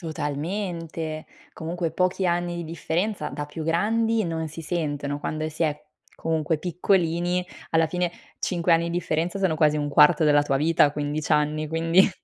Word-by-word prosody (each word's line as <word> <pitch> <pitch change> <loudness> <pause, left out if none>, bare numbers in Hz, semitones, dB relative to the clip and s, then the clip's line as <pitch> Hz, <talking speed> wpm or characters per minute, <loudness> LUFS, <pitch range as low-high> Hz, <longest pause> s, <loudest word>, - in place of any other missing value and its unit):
Totalmente. 160 0 -4 0.3
Comunque 165 0 -3
pochi 185 +1 0
anni 175 0 0
di 170 - -4
differenza 170 +6 -2
da 150 - -5
più 150 +2 -7
grandi 220 +7 +1
non 160 -2 -2
si 165 +2 -8
sentono. 145 -3 -2
Quando 155 +1 -3
si 160 +2 -3
è 150 -2 0 0.4
comunque 160 -1 0
piccolini, 175 +1 0 0.2
alla 165 0 +3
fine 180 +2 -1 0.3
5 175 -2 +1
anni 165 0 +4
di 170 - -2
differenza 170 +2 -1
sono 185 -5 +1
quasi 150 -1 +3
1/4 150 +2 +5
della 145 -1 +5
tua 135 -2 0
vita 155 +2 +4
a 145 - +3
15 150 +1 -3
anni, 150 0 +1
quindi. 165 +4 +4
165 Hz, 160 wpm, -25 LUFS, 155-175 Hz, 0.4 s, 1/4